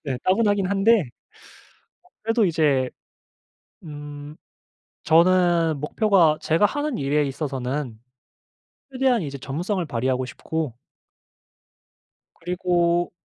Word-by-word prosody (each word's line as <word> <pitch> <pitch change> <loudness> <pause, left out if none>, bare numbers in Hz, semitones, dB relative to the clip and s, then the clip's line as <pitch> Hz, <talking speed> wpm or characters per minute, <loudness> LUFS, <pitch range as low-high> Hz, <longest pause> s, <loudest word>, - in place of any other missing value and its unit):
네 130 -3 -3
따분하긴 205 0 +2
한데 200 0 +3 1.0
어 - - -25 0.2
그래도 225 -1 +2
이제 145 -6 +1 1.0
음 145 0 -9 0.7
저는 170 -2 +3
목표가 170 -2 +2
제가 165 +6 +3
하는 290 +2 -3
일에 145 +2 +1
있어서는 135 -3 -4 0.9
최대한 255 -5 +1
이제 140 -2 -5
전문성을 175 +8 -3
발휘하고 130 +1 -1
싶고 155 -1 -4 1.6
그리고 175 0 0
165 Hz, 215 characters per minute, -23 LUFS, 145-195 Hz, 1.6 s, 한데